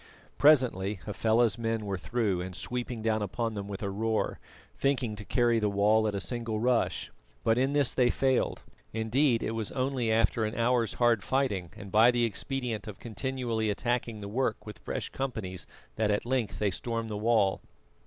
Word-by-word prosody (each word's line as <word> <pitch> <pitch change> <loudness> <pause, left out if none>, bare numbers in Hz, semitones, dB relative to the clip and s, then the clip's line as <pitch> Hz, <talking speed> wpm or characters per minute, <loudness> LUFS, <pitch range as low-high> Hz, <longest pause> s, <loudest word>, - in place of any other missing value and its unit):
Presently 125 -9 +4
Hafela's 110 +1 +2
men 115 -1 -1
were 100 -1 -2
through 105 -4 0
and 90 0 -6
sweeping 120 +1 -4
down 110 -1 +1
upon 115 +3 -2
them 100 -1 -5
with 100 0 -6
a 100 - -1
roar, 110 +2 -1 0.4
thinking 130 -5 0
to 105 - -7
carry 120 +1 +2
the 105 -1 +1
wall 105 +2 +3
at 105 - -1
a - - -1
single 115 0 -2
rush. 120 +1 +1 0.3
But 115 +1 +3
in 135 +2 +1
this 145 -3 +3
they 125 -1 +3
failed; 130 0 +1 0.3
indeed, 115 +3 +2
it - - -1
was 115 -2 -3
only 130 -3 0
after 115 0 +2
an 110 +1 -2
hour's 115 -2 +1
hard 120 -4 +3
fighting 105 -11 0
and 100 -1 -9
by 110 +4 +6
the 120 -1 +2
expedient 115 0 -3
of 105 - -7
continually 120 -1 -2
attacking 115 +1 -1
the 100 - -6
work 115 +2 -1
with 105 -1 -9
fresh - - -4
companies 110 -9 -4 0.3
that 110 -1 +1
at 105 +2 0
length 125 -3 -1
they 105 -2 +1
stormed 115 +3 -3
the - - -3
wall. 105 -3 +2
115 Hz, 185 wpm, -29 LUFS, 105-125 Hz, 0.4 s, by